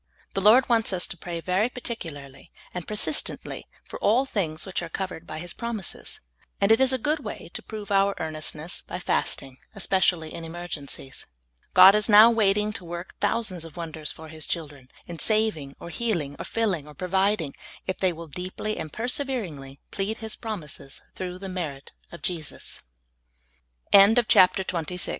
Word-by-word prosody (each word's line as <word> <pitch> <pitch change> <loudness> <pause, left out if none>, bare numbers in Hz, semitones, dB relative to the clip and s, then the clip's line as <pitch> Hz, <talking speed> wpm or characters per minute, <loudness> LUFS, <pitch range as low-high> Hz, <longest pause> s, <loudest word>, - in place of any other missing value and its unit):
The 195 - -1
Lord 225 +6 +7
wants 225 -4 +3
us 180 - +1
to - - -6
pray 170 0 -5
very 185 +7 +1
particularly 150 - -7 0.2
and 180 -2 -5
persistently 215 +7 0 0.2
for - - -8
all 240 +6 +3
things 170 -11 -2
which 190 -2 -2
are 175 - -5
covered 180 -2 -5
by 155 - -5
His 175 +2 -5
promises, 230 -6 -5 0.4
and 200 +2 +3
it 225 - +6
is 265 -1 +5
a 260 - +2
good 295 +5 0
way 220 - -7
to - - -5
prove 210 -2 -8
our 195 0 +4
earnestness 155 +1 -3
by - - -6
fasting, 130 -1 -1 0.2
especially 185 -4 +1
in 165 - -6
emergencies. 160 -5 -7 0.5
God 185 +2 +10
is 210 +2 +2
now 215 +2 +9
waiting 210 -1 +2
to 195 - -8
work 175 +1 -7
thousands 190 -7 0
of 165 -1 -11
wonders 160 -3 -3
for 160 0 -11
His 155 -1 -6
children, 145 -6 -5 0.2
in 170 -2 -8
saving, 215 -11 +1
or - - -8
healing, 170 -11 -1
or - - -4
filling, 195 -10 0
or 150 - -12
providing, 190 -3 +1 0.3
if 185 - -3
they 185 -1 +3
will 170 0 -7
deeply 185 +7 -4
and 155 - -5
perseveringly 215 - -3
pl 200 +3 -1
185 Hz, 145 wpm, -26 LUFS, 160-215 Hz, 0.5 s, God